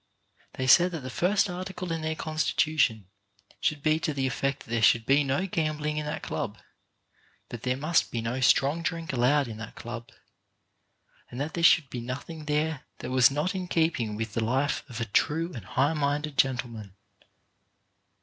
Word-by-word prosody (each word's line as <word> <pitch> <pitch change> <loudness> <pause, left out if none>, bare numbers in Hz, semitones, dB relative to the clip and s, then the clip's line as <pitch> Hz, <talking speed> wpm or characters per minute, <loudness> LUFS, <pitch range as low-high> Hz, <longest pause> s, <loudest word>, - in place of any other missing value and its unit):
They 130 - -3
said 175 +7 +6
that 160 - -4
the 130 0 -6
first 195 +7 +2
article 185 -1 -5
in 165 -1 -2
their 160 0 -2
constitution 155 - +1 0.5
should 150 -2 -1
be 155 0 +3
to 155 -2 -2
the 135 -1 0
effect 140 +1 -1
that - - -14
there 115 -1 +1
should 115 0 +4
be 140 +3 +4
no 140 +6 0
gambling 155 -4 -1
in 150 -1 -2
that 150 - -4
club; - - -4 0.9
that 120 - -7
there 125 +1 -1
must 155 +4 +1
be 120 - -3
no 115 +3 -2
strong 140 +5 +3
drink 165 -2 -3
allowed 135 +3 +3
in 110 -2 -7
that 110 0 -8
club, 115 0 -7 1.2
and 125 - -8
that 150 +3 -3
there 170 - -2
should 160 -5 +5
be 120 - -4
nothing 140 +6 -6
there 150 0 0 0.2
that 125 - -6
was 130 -1 +6
not 150 +6 -1
in 185 -1 -4
keeping 160 -11 0
with 110 -1 -4
the 115 - 0
life 135 +6 0
of 120 -2 -6
a 115 - -1
true 160 - 0
and 115 -8 -8
high 140 +9 +1
minded 145 0 -1
gentleman. 120 -7 -1
145 Hz, 185 wpm, -27 LUFS, 125-160 Hz, 1.2 s, said